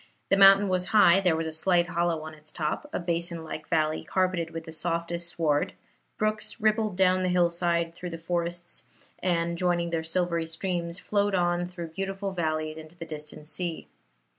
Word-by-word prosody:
The - - +5
mountain 195 +1 +7
was 185 -1 +1
high; 195 -3 +6
there 180 -4 +3
was 165 0 -2
a 160 - -3
slight 175 +2 +2
hollow 170 -2 0
on 155 0 -7
its 155 0 -8
top 155 - -3
a - - -2
basin 170 -1 -1
like 155 -1 -7
valley, 155 -2 +1
carpeted 185 -3 0
with 165 0 -6
the 160 - -9
softest 170 +1 -2
sward; 155 -4 0 0.4
brooks 215 +1 -1
rippled 215 -2 +1
down 185 -1 +4
the 185 - +1
hillside 170 -1 +1
through 180 +1 -6
the 165 - -6
forests, 175 +1 -2 0.4
and, 170 -1 0
joining 175 -1 +1
their 165 -1 -1
silvery 170 0 0
streams, 170 0 -3
flowed 205 0 0
on 175 0 +1
through 175 -2 -7
beautiful 195 +3 -3
valleys 155 -3 -2
into 160 +1 -11
the 165 - -6
distant 150 -1 -8
sea. 170 +1 -3
170 Hz, 180 wpm, -27 LUFS, 165-185 Hz, 0.4 s, mountain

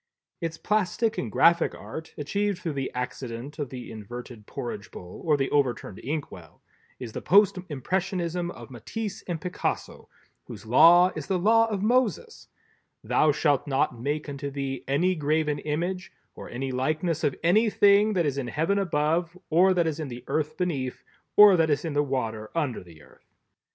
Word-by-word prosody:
Its 165 -1 -3
Plastic 215 +3 0
and 115 - -4
Graphic 170 +7 +4
Art 160 0 -9
(achieved 200 +6 -1
through 170 -3 -4
the 135 -1 -3
accident 125 +2 -5
of 145 -4 -3
the 125 -1 -8
inverted 115 +1 -9
Porridge 105 -4 -6
bowl 90 0 -10
or 155 -3 +3
the 135 -1 -1
overturned 125 -8 0
inkwell) 130 - -6 0.4
is 120 -3 -6
the - - -5
Post 200 +1 +4
Impressionism 175 +3 -2
of 155 - -10
Matisse 195 - -5
and 170 -3 -3
Picasso, 180 +4 -4 0.4
whose - - -10
law 170 +10 +7
is 155 -3 -6
the 190 - +1
Law 225 +5 +4
of 205 -3 -3
Moses—"Thou 250 - -1
shalt 145 -1 +1
not 130 -3 0
make 150 +4 -2
unto 140 0 -5
thee 135 -1 -4
any 170 +7 +2
graven 150 -2 0
image, 175 +6 -3 0.2
or - - -10
any 130 +2 -4
likeness 155 +5 -1
of 140 - +1
any 215 +7 +4
thing 205 +1 +4
that 175 -4 +1
is 140 -1 -1
in 130 - -4
heaven 165 +10 0
above, 165 0 0
or 180 +4 +5
that 175 -2 +2
is 160 -1 -2
in 155 - -3
the 120 -1 -8
earth 155 0 -2
beneath, 140 -9 -2 0.3
or 210 -2 +9
that 165 -2 +2
is 145 +2 0
in 160 - -3
the 145 - +3
water 115 -6 -3
under 145 - -1
the 80 -4 -16
earth." - - -23
155 Hz, 170 wpm, -26 LUFS, 130-180 Hz, 0.4 s, or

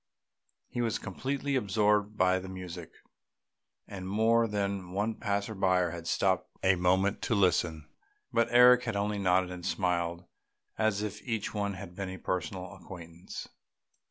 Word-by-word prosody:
He 120 - -3
was 115 -3 0
completely 135 +7 -3
absorbed 105 -2 +2
by 95 -1 +3
the 95 0 -8
music, 90 -3 -7 1.0
and 95 -2 -7
more 115 +3 +3
than 100 -3 -2
one 105 +3 0
passer 100 0 -2
by 95 -2 +2
had 85 -1 -7
stopped 95 +1 +1
a 95 0 +5
moment 95 +3 +2
to 115 - 0
listen; 85 -5 +1 0.5
but 115 0 +3
Eric 125 +1 +7
had 115 -3 -2
only 100 0 -1
nodded 90 -1 +2
and 90 -1 -7
smiled 85 -2 -1 0.5
as 110 -2 +1
if 105 0 -5
each 115 -4 -3
one 100 -2 -1
had 95 -2 -9
been 95 -1 -4
a 95 - -6
personal 90 +2 -3
acquaintance. 85 -3 -9
95 Hz, 150 wpm, -30 LUFS, 90-105 Hz, 1.0 s, Eric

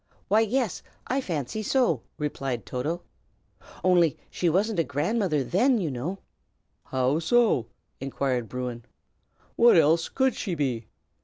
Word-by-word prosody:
"Why, 210 +3 +5
yes, 225 -2 0 0.2
I 265 +2 0
fancy 165 - -3
so," 215 - +2 0.2
replied 135 -5 -3
Toto. 155 +8 -3 0.8
"Only 175 -4 +4
she 175 - +1
wasn't 195 +3 +1
a - - +4
grandmother 155 - 0
then, 240 - +3
you 170 -8 -1
know." 145 +10 -4 0.7
"How 130 +4 +1
so?" 190 - +3 0.3
inquired 130 -3 -2
Bruin. 125 -2 -4 0.7
"What 235 -5 +6
else 165 +1 +4
could 265 -2 +1
she 185 -5 -3
be? 130 -7 -2
165 Hz, 130 wpm, -26 LUFS, 135-215 Hz, 0.8 s, What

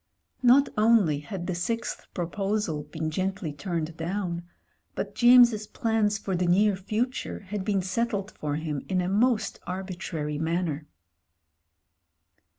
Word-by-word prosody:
Not 260 +3 +6
only 210 -10 +4
had 175 +3 -6
the 185 - -2
sixth 230 +7 -3
proposal 195 -2 -1
been 160 +1 -4
gently 185 -2 -2
turned 165 0 -3
down 175 0 -2 0.3
— - - -43
^but - - -3
James's 240 -3 +6
plans 220 -2 +1
for 195 -3 -3
the 180 0 0
near 200 +3 +4
future 215 +7 -2
had 200 0 -4
been 195 -2 0
settled 205 +1 -1
for 145 -1 -3
him 150 -2 -3
in 185 -1 +1
a 180 - 0
most 220 +4 +1
arbitrary 175 -5 -4
manner. 160 -2 -1
190 Hz, 135 wpm, -27 LUFS, 165-215 Hz, 0.3 s, Not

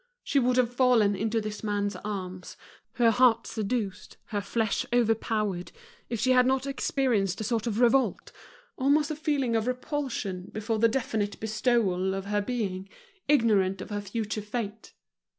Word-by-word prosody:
She 280 - +2
would 250 0 +2
have 245 -1 +2
fallen 240 -5 +4
into 220 +3 0
this 215 0 -5
man's 205 -1 -1
arms, 185 -3 -6 0.4
her 235 -1 +4
heart 235 -1 +4
seduced, 210 -3 -3
her 205 -1 -1
flesh 220 +1 -1
overpowered 215 -6 0 0.4
if 235 -2 -2
she 255 +4 +2
had 250 0 +5
not 265 0 +1
experienced 245 -8 0
a - - -2
sort 230 +1 -1
of 220 -1 -1
revolt, 250 +2 +2 0.5
almost 285 +3 +3
a - - -2
feeling 285 -6 0
of 225 +1 0
repulsion 250 -8 -3
before 215 +1 -2
the 230 - +5
definite 220 -4 -2
bestowal 215 -4 +1
of 195 0 -4
her 205 0 0
being, 200 -4 -3 0.4
ignorant 210 -9 +3
of 210 - -8
her 205 0 -2
future 215 +1 -3
fate. 210 0 -5
220 Hz, 155 wpm, -28 LUFS, 205-250 Hz, 0.5 s, had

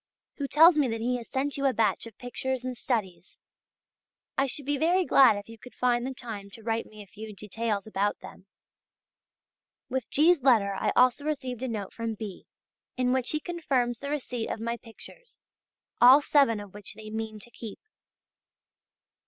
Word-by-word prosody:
who 280 - -2
tells 315 +3 +6
me 280 - +3
that 225 -1 -3
he 245 +2 0
has 235 - -10
sent 275 +2 -2
you 275 0 +2
a 265 - +2
batch 220 -1 +1
of 220 - -14
pictures 255 +1 -3
and 255 -1 -4
studies. 190 -8 -3 1.0
I 275 0 +2
should 275 +2 -3
be 285 0 0
very 355 +3 +3
glad 265 -9 +6
if 205 - -8
you 225 0 -12
could 250 - -14
find 245 0 +1
the 265 - -4
time 210 -5 -7
to 225 - -13
write 225 0 -1
me 215 -1 -11
a - - -16
few 215 +2 -10
details 210 0 -3
about 205 -1 -1
them. 190 - -13 1.4
With 260 -2 -3
G's. 320 +1 +4
letter 225 -7 +4
I 195 - 0
also 255 +3 +4
received 260 -5 -3
a 260 - -2
note 210 -5 -4
from 230 -1 -3
B. 210 -3 -8 0.5
in 250 0 +2
which 260 -1 0
he 305 - 0
confirms 270 -9 -1
the 280 - -5
receipt 250 -5 -3
of - - -3
my 230 +1 -2
pictures, 240 - -13 0.6
all 255 +4 +9
seven 280 -7 +3
of 205 -2 -10
which 205 0 -8
they 215 0 -10
mean 220 0 -4
to 240 - -12
keep. 225 -4 -9
240 Hz, 185 wpm, -28 LUFS, 215-270 Hz, 1.4 s, all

